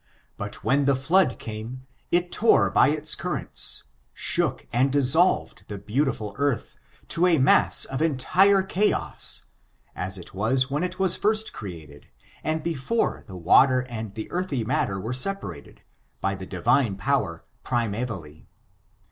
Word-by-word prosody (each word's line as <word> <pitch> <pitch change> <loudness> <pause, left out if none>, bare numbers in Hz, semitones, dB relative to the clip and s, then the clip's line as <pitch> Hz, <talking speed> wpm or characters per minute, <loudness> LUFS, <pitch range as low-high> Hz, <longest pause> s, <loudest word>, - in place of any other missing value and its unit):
But 105 0 -7
when 140 +1 +2
the 140 -1 +3
flood 145 +1 +2
came, 115 +4 -8 0.3
it 175 +1 +1
tore 225 +1 +3
by - - +5
its 150 +1 0
currents, - - -1 0.3
shook - - 0
and 130 +3 +2
dissolved 145 +6 +2
the 105 - -6
beautiful 110 0 -2
earth, 140 -5 -1 0.3
to 170 +2 +2
a 170 -3 +4
mass 135 +1 +3
of 135 +2 -4
entire 185 +7 +3
chaos, 195 +2 +1 0.5
as 95 +2 -3
it 90 - -10
was 130 +7 0
when 145 +3 -1
it 180 0 -3
was 190 -2 +3
first 215 +1 -1
created, 80 -8 -10 0.3
and 155 0 -2
before 170 - -1
the 95 -3 -9
water 130 +9 +5
and 110 -4 -7
the 110 - -6
earthy 175 -9 -2
matter 110 -4 -1
I 95 - -5
were 115 +3 -3
separated, 165 - -4 0.4
by 95 - -1
the 95 -1 -8
Divine 105 - +1
Power, 95 -7 -1 0.2
primevally. 110 -10 -3
130 Hz, 145 wpm, -25 LUFS, 105-160 Hz, 0.5 s, by